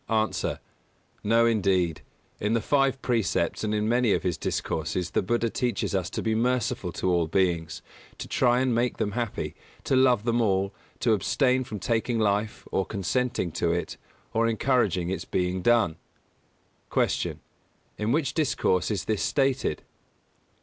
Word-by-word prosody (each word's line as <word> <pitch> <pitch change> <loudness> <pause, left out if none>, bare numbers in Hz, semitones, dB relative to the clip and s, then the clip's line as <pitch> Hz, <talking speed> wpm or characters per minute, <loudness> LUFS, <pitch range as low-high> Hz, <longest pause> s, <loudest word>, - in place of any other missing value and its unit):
_ 110 -1 +1
A. - - -2 0.6
No, 115 +2 +4
indeed. 95 -7 +1 0.4
In 105 +2 0
the 115 - +3
Five 135 +2 +2
Precepts 110 -8 0
and 105 - -1
in 105 0 0
many 120 -1 +3
of - - 0
his 90 -3 0
discourses, 85 +3 -2
the - - +1
Buddha 115 +4 0
teaches 120 -1 -1
us 95 -3 0
to - - -4
be 110 - +1
merciful 115 -5 0
to 95 - 0
all 85 -2 +2
beings, 85 -3 0 0.3
to - - -6
try 125 -1 +2
and 130 -2 +1
make 120 +1 0
them 105 - -1
happy, 120 -1 -3 0.3
to 135 - +1
love 125 -4 +4
them 120 0 +1
all, 100 -2 +1 0.3
to 115 -2 +3
abstain 130 +5 +2
from 110 -4 -6
taking 115 +3 0
life, 105 +1 0
or 95 - +1
consenting 105 0 -1
to 85 - 0
it, 85 +1 -2 0.4
or 115 +1 +2
encouraging 110 -7 +1
its 95 -3 -3
being 90 0 -1
done. 110 -7 +3 0.9
202. - - +1
Q. - - -18 0.7
_In - - +2
which 140 -2 +1
discourse 135 - +1
is 105 -3 -2
this 110 -2 -1
stated? 135 - 0
110 Hz, 165 wpm, -26 LUFS, 95-120 Hz, 0.9 s, No